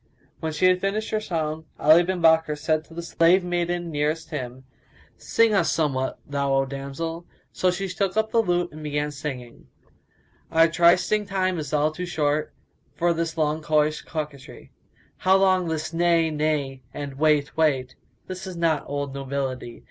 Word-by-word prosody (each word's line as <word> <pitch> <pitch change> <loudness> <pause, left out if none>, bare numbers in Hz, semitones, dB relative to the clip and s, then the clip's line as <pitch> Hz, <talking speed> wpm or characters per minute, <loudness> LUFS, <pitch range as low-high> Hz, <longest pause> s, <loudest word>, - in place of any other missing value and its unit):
'" - - -36
When 160 - -3
she 155 +4 0
had 185 0 +4
finished 210 +2 -2
her 215 - +1
song, 160 -5 -3
Ali 155 +3 +6
bin 175 -1 -2
Bakkar 160 -2 +4
said 155 +1 0
to 165 - -15
the 170 - -5
slave 170 +2 +3
maiden 175 -1 -2
nearest 155 +2 -2
him, 130 -3 -5 0.5
"Sing 230 -1 +2
us 190 -4 +2
somewhat, 135 -5 -1
thou 140 -1 0
O 135 0 +2
damsel." 140 +5 -5 0.2
So 185 - +1
she 185 +2 -2
took 190 +1 -1
the 220 +1 +2
lute 175 -3 0
and 155 - -10
began 150 0 -2
singing, 135 -5 -7 0.8
"Our 165 0 +5
trysting 175 +5 +3
time 185 -3 0
is 150 -3 -5
all 150 0 +2
too 180 +3 -5
short 150 -3 0 0.2
* 135 - -41
For 170 +3 +2
this 165 0 -3
long 155 0 0
coyish 155 0 +1
coquetry: 150 -4 -7 0.5
How 190 +1 +3
long 185 -2 +3
this 160 0 -3
'Nay, 165 -1 +2
Nay!' 150 -3 -1
and 140 -2 -7
'Wait, 150 -2 +2
wait?' 135 -5 +1 0.2
* - - -42
This 185 +1 -6
is 185 -2 -7
not 160 -4 +1
old 145 -1 -3
nobility! 135 -3 -4
160 Hz, 175 wpm, -24 LUFS, 145-175 Hz, 0.8 s, Ali